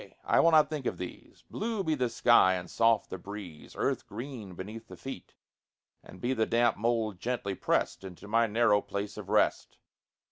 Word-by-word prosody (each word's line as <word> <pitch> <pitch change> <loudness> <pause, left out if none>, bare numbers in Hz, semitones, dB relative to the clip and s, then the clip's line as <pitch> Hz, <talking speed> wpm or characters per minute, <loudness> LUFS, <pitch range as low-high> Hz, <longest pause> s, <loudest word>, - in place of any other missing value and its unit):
I - - +3
will 165 - +6
not 155 -2 +6
think 150 -4 -4
of - - -2
these: 90 - -9
Blue 220 -2 -2
be 160 -3 +1
the 130 -5 0
sky 115 -5 +5
and 90 -1 -5
soft 115 +3 +2
the 95 - -5
breeze, 95 -5 -9
Earth - - -1
green 110 -4 -7
beneath 110 +5 -8
the - - -11
feet, 135 - -9 0.7
And 90 - -13
be 125 +2 0
the 110 -3 0
damp 120 0 +3
mold 110 -3 -1
gently 120 -3 -2
pressed 95 - -1
Into 95 +1 -10
my 115 +2 +3
narrow 105 -1 +3
place 100 0 -5
of - - -8
rest. - - +1
115 Hz, 185 wpm, -30 LUFS, 100-125 Hz, 0.7 s, will